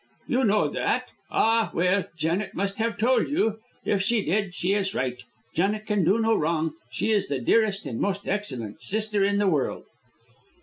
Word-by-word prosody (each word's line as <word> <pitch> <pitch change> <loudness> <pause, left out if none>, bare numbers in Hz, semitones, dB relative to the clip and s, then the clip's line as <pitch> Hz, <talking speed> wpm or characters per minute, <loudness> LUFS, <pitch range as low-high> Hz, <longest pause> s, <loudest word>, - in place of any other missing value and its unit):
"You 255 +2 +1
know 210 0 +3
that? - - -1 0.2
Ah, 225 -3 +3
well, 180 +3 +2
Janet 165 +6 -1
must 200 +2 -2
have 225 -2 0
told 240 +2 +3
you. 225 -7 +1 0.3
If 200 - +1
she 215 +2 +1
did, 195 +2 0
she 185 +3 0
is 200 -1 -1
right. 125 -1 -2 0.3
Janet 205 +5 0
can 210 -3 +1
do 190 +7 +4
no 225 0 +2
wrong. 160 0 0 0.2
She 225 - -1
is 205 -2 +2
the 140 - -1
dearest 205 - +2
and 115 - -4
most 200 0 -1
excellent 130 - -3
sister 210 - -1
in 200 +1 +2
the 205 - +2
world." 155 -7 0
200 Hz, 180 wpm, -26 LUFS, 170-215 Hz, 0.3 s, do